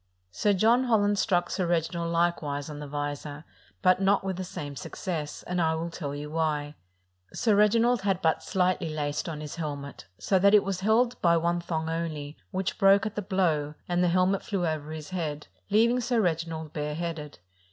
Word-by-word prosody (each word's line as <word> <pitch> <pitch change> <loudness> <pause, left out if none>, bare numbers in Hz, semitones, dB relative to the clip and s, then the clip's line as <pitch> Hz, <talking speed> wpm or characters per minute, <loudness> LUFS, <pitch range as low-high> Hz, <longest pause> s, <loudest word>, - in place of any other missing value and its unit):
Sir 205 - +2
John 230 +6 +4
Holland 205 -4 +2
struck 175 -4 +1
Sir 180 - -1
Reginald 170 0 -1
likewise 155 -4 0
on 145 - -7
the 150 - -6
visor, 145 +1 -5 0.4
but 185 0 +4
not 195 +1 +3
with 190 -2 -3
the 185 - -3
same 145 -5 -6
success, 155 +1 -5
and 180 0 -1
I 160 -1 +2
will 165 +1 -4
tell 145 -4 -5
you 150 +1 -6
why: 150 -2 -1 0.6
Sir 220 -3 +2
Reginald 230 +3 +4
had 195 -2 +1
but 160 -3 +1
slightly 180 -3 0
laced 150 +1 -2
on 150 -2 -5
his 150 +1 -7
helmet, 145 -3 -6
so 190 - +1
that 200 +2 +6
it 210 - +6
was 195 -2 -2
held 230 +5 +2
by 170 -1 +4
one 170 +1 0
thong 160 -2 -3
only, 160 -3 -3
which 190 0 -3
broke 195 +1 +5
at 215 - -3
the 210 - -3
blow, 165 -7 0
and 175 0 +1
the - - +3
helmet 185 +2 +2
flew 195 -4 -2
over 155 -2 -2
his 155 0 -7
head, 155 -5 -3 0.2
leaving 230 +4 +4
Sir 240 0 +1
Reginald 165 -4 -1
bare 150 0 -3
headed. 165 -3 -5
170 Hz, 195 wpm, -27 LUFS, 150-195 Hz, 0.6 s, that